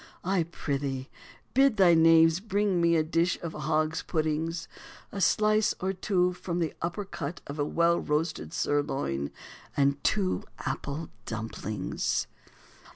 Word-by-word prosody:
I 190 0 +1
prithee 140 -5 -3 0.4
bid 270 -3 +4
thy 185 -3 +6
knaves 165 0 +6
bring 200 -3 0
me 170 0 +4
a 160 - +3
dish 165 +2 +1
of 165 -1 -4
hog's 155 +1 0
puddings, 160 +1 -1 0.4
a 200 - -4
slice 215 +3 +3
or 190 +1 -1
two 180 -1 +1
from 175 -1 -4
the 165 -3 -1
upper 175 +5 -3
cut 170 -3 -5
of 140 +2 -7
a 145 - +2
well 170 +2 +2
roasted 150 - -1
sirloin, 135 - -1 0.5
and 140 0 +2
two 195 -3 +1
apple 145 +3 -4 0.2
dumplings." 110 -3 -2
165 Hz, 135 wpm, -28 LUFS, 145-180 Hz, 0.5 s, thy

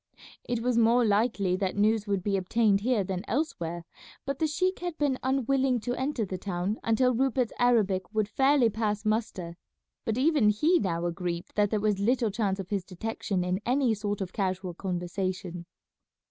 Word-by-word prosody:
It 240 -1 0
was 245 -1 +2
more 235 +1 +4
likely 205 -3 +2
that 190 -1 -1
news 210 +1 +2
would 200 -3 -1
be 200 0 0
obtained 200 +2 +2
here 235 -2 +1
than 185 0 -4
elsewhere, 175 - -2 0.4
but 275 -1 -3
the 315 - +2
sheik 370 +5 0
had 350 -2 -4
been 280 -3 0
unwilling 265 -1 +1
to 245 +2 -2
enter 260 -3 -1
the 185 -1 -5
town 190 +2 -2
until 250 +3 +3
Rupert's 255 -1 +1
Arabic 210 -7 +2
would 215 -2 0
fairly 270 +3 +3
pass 210 0 -2
muster; 215 -6 -2 0.5
but 225 0 -1
even 280 -5 +4
he 310 - +3
now 170 -2 -1
agreed 175 0 -3
that 205 -1 +2
there 215 - 0
was 205 -1 +1
little 230 +1 +1
chance 200 -2 -1
of 195 +1 -6
his 200 -3 0
detection 190 0 -3
in 180 +2 -1
any 255 -1 +2
sort 205 -1 -3
of 185 -2 -4
casual 185 -2 -2
conversation. 180 -1 -4
210 Hz, 175 wpm, -28 LUFS, 190-245 Hz, 0.5 s, more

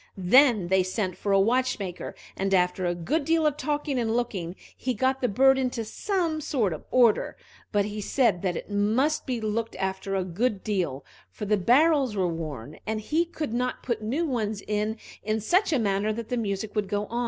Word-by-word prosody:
Then 210 0 +5
they 190 0 +4
sent 185 0 -2
for 200 - -3
a 195 - +5
watchmaker, 220 -4 0 0.2
and 195 0 +1
after 180 0 +1
a 175 - 0
good 285 - -1
deal 325 +1 +2
of 300 -2 +2
talking 295 -2 -1
and 225 -1 0
looking, 190 -8 -3 0.2
he 255 -1 -2
got 260 +4 +1
the 250 - +2
bird 265 +5 +4
into 250 -3 -1
some 335 - -1
sort 230 - 0
of 155 - -8
order; 240 -4 +3 0.3
but 205 -2 +2
he 210 0 -5
said 210 -5 +2
that 180 -3 -1
it - - -7
must 220 +11 +1
be 250 -3 -1
looked 220 +1 -2
after 190 +1 -2
a 190 - +1
good 195 +4 -1
deal, 175 -10 -2 0.2
for 210 - -7
the 210 +1 +3
barrels 260 - +3
were 185 -2 +1
worn, 155 -5 -6
and 220 0 -1
he 315 +10 +1
could 310 -7 -5
not 250 +1 -2
put 235 -3 -2
new 265 +11 -1
ones 220 -7 -2
in 210 +1 -1 0.2
in 215 +2 -1
such 360 - +2
a 295 - +3
manner 205 -1 +1
that 225 +1 -5
the 250 - -1
music 205 -1 -2
would 210 -2 0
go. 205 +1 -2
215 Hz, 200 wpm, -26 LUFS, 195-260 Hz, 0.3 s, Then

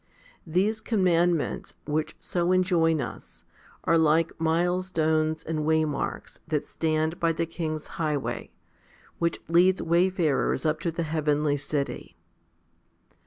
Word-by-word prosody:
These 200 +7 +1
com 215 -5 0
mandments, 170 -2 +1
which 155 +1 -2
so 175 0 -1
enjoin 175 -4 +3
us, 120 - -8 0.4
are 165 - +3
like 160 +1 +3
milestones 160 -2 +1
and 155 -1 -2
waymarks 155 -2 -1
that 155 -2 -1
stand 160 +1 -1
by 165 -1 +2
the 165 +1 -1
king's 155 -2 -4 0.2
highway, 150 -3 -2 0.7
which 170 0 0
leads 180 +2 +4
wayfarers 170 -6 +1
up 155 0 +1
to 170 - -2
the 165 +1 -2
heavenly 150 -2 +1
city. 145 0 -4
160 Hz, 120 wpm, -26 LUFS, 155-175 Hz, 0.7 s, leads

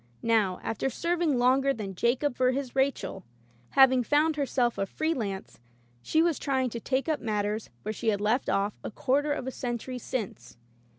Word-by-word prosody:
Now, 215 -5 +2
after 225 +4 -1
serving 335 -1 0
longer 265 +3 +3
than 200 -3 -5
Jacob 245 +7 +1
for 255 0 +2
his 270 -1 -4
Rachel, 265 -8 0 0.5
having 260 -2 +6
found 300 +5 +2
herself 255 -4 0
a 195 - 0
free 315 +8 -1
lance, 200 - -5 0.4
she 315 - +2
was 335 -3 +1
trying 260 -3 0
to 235 - -4
take 260 +5 -1
up 310 -2 0
matters 210 -1 -2
where 215 - -3
she 230 - -5
had 205 -2 +2
left 220 +5 +1
off 200 +1 +1
a - - -4
quarter 280 +6 0
of 285 -3 -2
a 260 - -3
century 250 0 -4
since. 180 - -5
250 Hz, 180 wpm, -28 LUFS, 215-275 Hz, 0.5 s, having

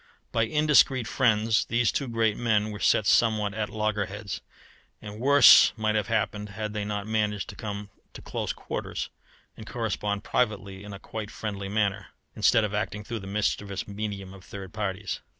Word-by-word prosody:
By 115 - +2
indiscreet 145 -3 +4
friends 110 -3 +2
these 115 0 +2
two 140 - -2
great 115 -2 +1
men 110 -2 +1
were 105 - -7
set 105 - +3
somewhat 105 0 +3
at 105 0 -2
loggerheads, 105 -1 -3 0.6
and 105 0 -9
worse 140 +2 +8
might 110 -1 +1
have 105 -2 0
happened 105 -2 -1
had 105 +1 -5
they 105 -1 -2
not 105 -1 -3
managed 105 -2 -1
to - - -8
come 105 -1 -6 0.2
to - - -10
close - - -3
quarters, - - -5 0.4
and 110 - -11
correspond 105 -3 -2
privately 100 -5 -1
in 105 - -9
a 100 - -7
quite 105 +1 -6
friendly 100 -4 -5
manner, 100 -1 0 0.3
instead 115 - +4
of 105 -1 -2
acting 105 0 -2
through 115 +2 -5
the 95 - -9
mischievous 100 -1 -2
medium 100 -2 -5
of 95 -1 -13
third 95 -3 -9
parties. 100 -2 -3
105 Hz, 170 wpm, -27 LUFS, 100-110 Hz, 0.6 s, worse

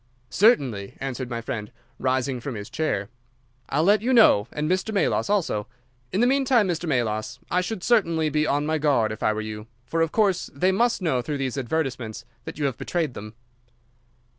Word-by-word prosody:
"Certainly," 135 - +2
answered 130 -2 -4
my 115 -1 -3
friend, 105 -2 -5 0.3
rising 130 0 0
from 125 0 -5
his 105 -1 -7
chair. 105 -11 -1 0.6
"I'll 150 +3 +1
let 205 +4 +4
you 255 +3 +1
know, 170 - +6
and 150 +1 -2
Mr. 185 +5 0
Melas 200 -1 +1
also. 170 - 0 0.4
In 200 - +1
the - - +5
meantime, 255 -4 +3
Mr. 170 -1 -2
Melas, 115 -3 -1
I 180 - +3
should 185 0 -4
certainly 170 -9 +2
be 150 0 +1
on 145 +1 +1
my 155 0 0
guard, 135 -8 +2
if 110 - -7
I - - +3
were 110 0 -2
you, 110 0 -7 0.2
for 165 +4 -1
of 165 -1 +1
course 200 -5 +1
they 185 +7 +2
must 230 +1 +1
know 135 -7 +1
through 145 +3 -3
these 135 -3 -2
advertisements 125 -5 -3 0.2
that - - -7
you 150 - -1
have 135 -4 -2
betrayed 165 -7 -1
them." 105 0 -9
145 Hz, 190 wpm, -24 LUFS, 120-185 Hz, 0.6 s, know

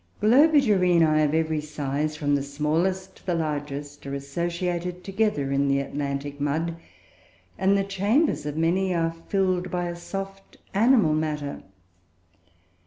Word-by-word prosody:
Globigerinoe 205 - +4
of 150 +1 +1
every 160 -1 0
size, 150 0 -3
from 145 -2 0
the 140 - +2
smallest 165 +7 -1
to - - -22
the 175 - +1
largest, 145 -2 -4
are 140 - -3
associated 175 +5 -3
together 195 -9 0
in 140 +1 +2
the 140 0 +2
Atlantic 140 0 -4
mud, 160 +4 -1 0.8
and 195 +1 +2
the 195 - +1
chambers 200 - +1
of 150 +1 -4
many 180 +3 +1
are 165 -1 0 0.2
filled 185 -2 +1
by 175 -1 -2
a 175 0 -4
soft 195 +2 -7 0.2
animal 220 -5 +4
matter. 150 -2 -2
165 Hz, 135 wpm, -25 LUFS, 145-190 Hz, 0.8 s, Globigerinoe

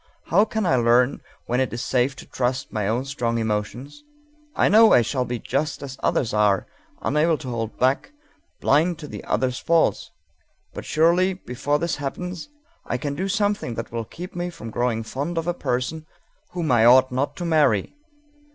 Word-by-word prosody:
How 200 +6 +5
can 220 -1 -2
I 135 -7 +3
learn 120 +2 +3 0.2
when 125 +1 0
it 130 - 0
is 120 +1 -3
safe 130 +2 +1
to - - -11
trust 130 +1 -2
my 105 -2 -1
own 120 +5 0
strong 120 -4 -2
emotions? 115 - -3 0.5
I - - +3
know 220 +2 +7
I 120 - +6
shall 125 +2 -1
be 120 0 -3
just 145 +4 -2
as 135 -2 -7
others 115 - 0
are, 105 -2 +2 0.4
unable 155 +3 +2
to 135 -4 -7
hold 115 -2 -4
back, 130 - +1 0.5
blind 160 +4 +2
to 150 -1 -9
the 105 -6 -8
other's 125 +2 0
faults, 165 -1 +1 0.6
but - - -7
surely 175 +4 +3
before 145 -3 -2
this 170 +2 -2
happens 180 - -5 0.3
I 125 - -2
can 140 +3 -3
do 185 +7 -2
something 205 - -1
that 115 - -5
will 115 -1 -3
keep 180 - -9
me 175 0 -2
from 115 -10 -9
growing 120 -1 -1
fond 140 +9 -4
of 165 - -1
a 175 - 0
person 155 +3 -3 0.4
whom 170 -5 -2
I 120 -2 +5
ought 130 +2 +6
not 130 +3 -1
to 175 - -5
marry! 145 - +2
135 Hz, 185 wpm, -23 LUFS, 120-165 Hz, 0.6 s, know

